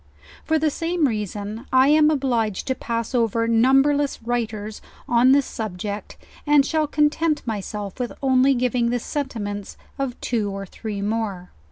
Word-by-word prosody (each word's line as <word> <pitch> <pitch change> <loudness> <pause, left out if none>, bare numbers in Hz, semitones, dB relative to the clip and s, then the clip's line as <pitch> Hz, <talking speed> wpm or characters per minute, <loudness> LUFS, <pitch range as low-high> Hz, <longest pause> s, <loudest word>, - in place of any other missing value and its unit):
For 320 - +1
the 310 -1 +1
same 330 0 0
reason 210 +1 -4
I 260 +1 +5
am 305 0 +5
obliged 240 -9 0
to 260 - 0
pass 230 -1 -4
over 230 -1 +1
numberless 270 +5 +3
writers 220 -3 -3 0.3
on 245 +2 +5
this 280 0 +4
subject; 205 -1 -5 0.3
and 290 -2 +5
shall 310 +1 0
content 300 +1 +1
myself 210 -1 -5
with 245 -1 -2
only 265 0 +3
giving 245 -1 +1
the 245 - +1
sentiments 220 -7 -4 0.2
of 270 -3 -3
two 220 -4 -1
or 195 0 -5
three 205 +1 -6
more. 205 -4 -3
240 Hz, 150 wpm, -23 LUFS, 215-275 Hz, 0.3 s, I